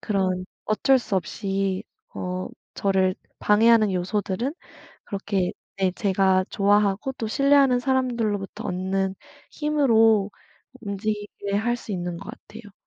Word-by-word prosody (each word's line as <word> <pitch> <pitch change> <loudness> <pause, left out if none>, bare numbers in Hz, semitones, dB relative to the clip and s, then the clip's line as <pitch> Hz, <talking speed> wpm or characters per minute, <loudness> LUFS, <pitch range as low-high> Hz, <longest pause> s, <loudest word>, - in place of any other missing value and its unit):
그런 185 -3 0 0.2
어쩔 260 +5 +3
수 210 -5 -2
없이 195 0 -2 0.3
어 185 0 -4 0.3
저를 190 -2 +1 0.2
방해하는 220 0 +5
요소들은 200 - -1 0.5
그렇게 195 -2 -2 0.3
네 190 -1 +2
제가 190 -1 +2
좋아하고 205 +4 +2
또 230 - -5
신뢰하는 275 +1 +4
사람들로부터 240 -6 -1
얻는 190 +1 -1 0.4
힘으로 225 -9 +3 0.5
움직이게 205 -1 -4
할 240 +3 +1
수 235 - -10
있는 175 -2 -3
것 195 - -8
같아요. 215 -2 -13
205 Hz, 260 characters per minute, -24 LUFS, 190-230 Hz, 0.5 s, 방해하는